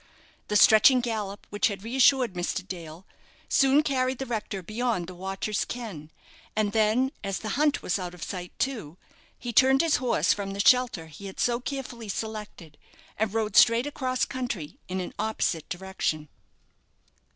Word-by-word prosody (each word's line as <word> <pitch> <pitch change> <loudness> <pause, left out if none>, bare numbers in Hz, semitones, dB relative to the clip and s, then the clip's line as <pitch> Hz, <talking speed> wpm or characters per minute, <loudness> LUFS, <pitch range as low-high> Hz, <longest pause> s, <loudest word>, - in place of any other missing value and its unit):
The 210 - -2
stretching 220 +5 +7
gallop 215 -4 -4
which 205 - +2
had 200 -3 -5
reassured 255 -1 +3
Mr. 180 +1 -3
Dale 170 -1 -8 0.4
soon 275 +2 +4
carried 260 -3 0
the 270 - -4
rector 210 -5 -4
beyond 215 -2 -1
the 185 - -9
watcher's 195 +3 -2
ken, 200 -12 -7 0.5
and 215 -1 +1
then, 225 +5 +2
as 195 -1 -2
the 215 - -5
hunt 290 +7 +1
was 180 - 0
out 180 -1 -5
of 175 - -9
sight 180 -2 -6
too, 215 - -3 0.4
he 240 -1 -5
turned 265 +3 +5
his 330 -2 +3
horse 250 -1 +2
from 195 -1 -5
the 200 - -7
shelter 245 -6 +3
he 160 +6 -10
had 190 - -10
so 240 -1 +1
carefully 250 -4 -6
selected, 210 -7 -6 0.4
and 220 -2 +1
rode 220 -3 -1
straight 230 +2 +6
across 260 -3 -1
country 235 - -5
in 185 +1 -3
an 180 - -5
opposite 200 -7 -1
direction. 175 -5 -3
215 Hz, 165 wpm, -27 LUFS, 190-250 Hz, 0.5 s, stretching